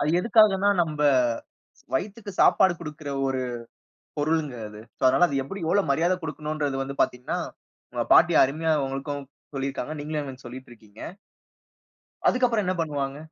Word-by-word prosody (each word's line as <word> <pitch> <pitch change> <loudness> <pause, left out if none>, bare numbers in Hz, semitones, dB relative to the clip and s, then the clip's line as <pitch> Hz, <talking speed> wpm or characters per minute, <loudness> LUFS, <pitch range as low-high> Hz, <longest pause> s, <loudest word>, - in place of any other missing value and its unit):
அது 145 +2 +1
எதுக்காகன்னா, 205 -2 +4
நம்ப 150 -2 -3 0.9
வயித்துக்கு 205 +7 -3
சாப்பாடு 190 -2 +5
குடுக்குற 150 -2 -7 0.2
ஒரு 130 -1 -1 0.8
பொருள்ங்க 150 -3 0
அது. 105 0 -11 0.2
சோ - - -39
அதனால 135 +7 +5
அது 140 - -3
எப்டி 195 +7 -7
எவ்வளோ 200 +4 +3
மரியாத 170 +6 +2
குடுக்கணும்ன்றது 150 -3 -3
வந்து 135 +1 -6
பார்த்தீங்கன்னா, 125 0 -1 0.5
உங்க - - 0
பாட்டி - - +6
அருமையா 160 +4 0
உங்களுக்கும் 140 +1 -4 0.3
சொல்லியிருக்காங்க. 135 +2 -3
நீங்களும் 150 0 -3
எனக்கு 130 -2 -10
சொல்லிட்டு 130 +2 -9
இருக்கிங்க. 110 -2 -16 1.3
அதுக்கு 250 0 +3
அப்புறம் 220 -5 0
என்ன 185 - 0
பண்ணுவாங்க? 140 -3 -3
150 Hz, 140 wpm, -25 LUFS, 135-175 Hz, 1.3 s, பாட்டி